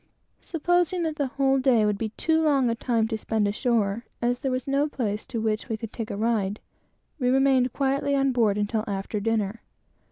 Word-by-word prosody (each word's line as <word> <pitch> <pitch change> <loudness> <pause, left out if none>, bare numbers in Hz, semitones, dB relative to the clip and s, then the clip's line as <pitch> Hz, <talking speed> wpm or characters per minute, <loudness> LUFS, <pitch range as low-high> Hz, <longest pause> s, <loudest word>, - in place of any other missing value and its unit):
Supposing 350 +1 0
that 315 -2 -2
the 285 -3 0
whole 270 0 +1
day 250 -5 +3
would 210 -1 0
be 225 - -2
too 320 0 +2
long 275 -6 +3
a - - +1
time 230 -1 0
to 220 - -1
spend 215 -1 0
ashore, 215 0 0 0.2
as 245 +1 0
there 270 - -1
was 255 +1 -2
no 280 +2 +1
place 210 -7 -3
to 235 - -3
which 220 +2 -1
we 225 - -1
could 225 0 -8
take 225 -2 -5
a - - -4
ride, 210 -2 0 0.6
we 250 -2 +1
remained 260 -1 +3
quietly 280 +1 0
on 275 -1 +2
board 225 -5 +2
until 210 +1 -1
after 200 +1 -3
dinner. 220 0 -1
240 Hz, 200 wpm, -25 LUFS, 215-275 Hz, 0.6 s, day